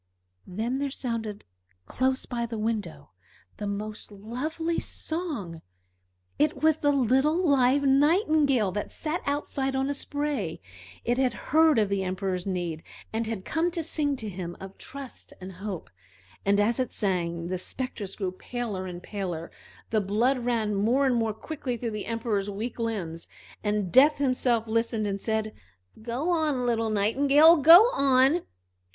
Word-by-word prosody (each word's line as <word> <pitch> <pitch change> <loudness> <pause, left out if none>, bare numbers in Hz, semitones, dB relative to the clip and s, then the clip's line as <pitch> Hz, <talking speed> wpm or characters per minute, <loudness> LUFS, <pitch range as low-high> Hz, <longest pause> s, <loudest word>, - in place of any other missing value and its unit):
Then 225 +8 -2
there 280 0 -1
sounded 230 -6 -4 0.4
close 260 - 0
by 235 -2 -3
the 230 -1 -5
window 215 -1 -3 0.5
the 205 - -4
most 210 +2 -5
lovely 280 +11 -3
song. 285 - -5 0.8
It 300 +1 +1
was 315 -1 +4
the 290 - +1
little 280 +7 +2
live 275 0 +4
Nightingale, 285 - +3
that 205 +2 -4
sat 315 +2 -3
outside 280 -2 -1
on 270 +1 0
a - - 0
spray. 285 - -2 0.5
It 240 +2 +1
had 255 -3 +1 0.2
heard 315 -3 +6
of 210 -3 +2
the 200 -1 0
Emperor's 185 0 -2
need, 175 -4 -3 0.3
and 225 0 -1
had 220 -4 -4
come 330 +2 +1
to 340 -1 -3
sing 295 -2 0
to 220 -5 -5
him 175 -3 -6
of 195 0 -9
trust 275 -2 -9
and 185 0 -8
hope. 190 -1 -6 0.6
And 200 +1 +4
as 225 +4 +2
it 255 - -1
sang 170 -4 -2
the 185 0 -2
spectres 210 -3 -5
grew 190 -3 -2
paler 205 -1 -5
and 175 -1 -8
paler; 180 -5 -5 0.4
the 215 -1 +2
blood 230 +7 +1
ran 230 -3 0
more 230 +8 +2
and 260 - +3
more 225 -2 +1
quickly 260 -1 -4
through 230 0 -3
the 210 -1 -5
Emperor's 225 -3 -1
weak 220 +5 -5
limbs, 190 -8 -3 0.4
and 210 -3 -1
Death 285 +4 +6
himself 250 -4 +1
listened, 230 -1 0
and 200 -1 -2
said: 220 -1 -1 0.5
"Go 245 +9 -2
on, 305 -7 +1
little 230 -2 +1
Nightingale, 280 +10 +5
go 330 +7 +9
on!" 275 +4 +4
230 Hz, 155 wpm, -27 LUFS, 200-280 Hz, 0.8 s, go